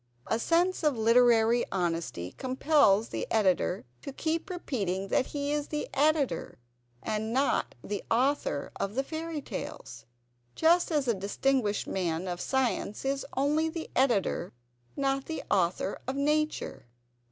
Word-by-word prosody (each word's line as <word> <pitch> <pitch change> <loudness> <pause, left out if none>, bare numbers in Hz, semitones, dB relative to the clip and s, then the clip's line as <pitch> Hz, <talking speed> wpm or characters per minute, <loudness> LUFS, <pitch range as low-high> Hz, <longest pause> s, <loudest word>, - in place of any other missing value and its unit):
A 225 - 0
sense 345 +7 +2
of 300 -6 +2
literary 230 0 +4
honesty 165 - -2
compels 255 -5 +3
the - - -3
Editor 190 -6 +1 0.2
to - - -6
keep 320 +6 -2
repeating 195 - -2
that 255 - +2
he 285 0 -3
is 295 -1 -1
the 300 -1 -3
Editor, 285 - +1 0.5
and 220 +1 -2
not 270 +3 +1
the 205 -1 -4
author 250 - +1
of 200 +2 -2
the 270 - +1
Fairy 320 +1 -4
Tales, 115 -2 -7 0.5
just 340 +2 +4
as 295 -4 +1
a 235 - +3
distinguished 210 +3 0
man 175 -1 -2
of 175 -1 -3
science 260 -4 -1
is 275 0 -1
only 300 +4 +2
the 320 0 -6
Editor, 235 -8 +1 0.4
not 275 0 0
the 320 - -4
Author 185 +1 +1
of 260 - -2
Nature. 300 - -1
255 Hz, 140 wpm, -29 LUFS, 200-295 Hz, 0.5 s, literary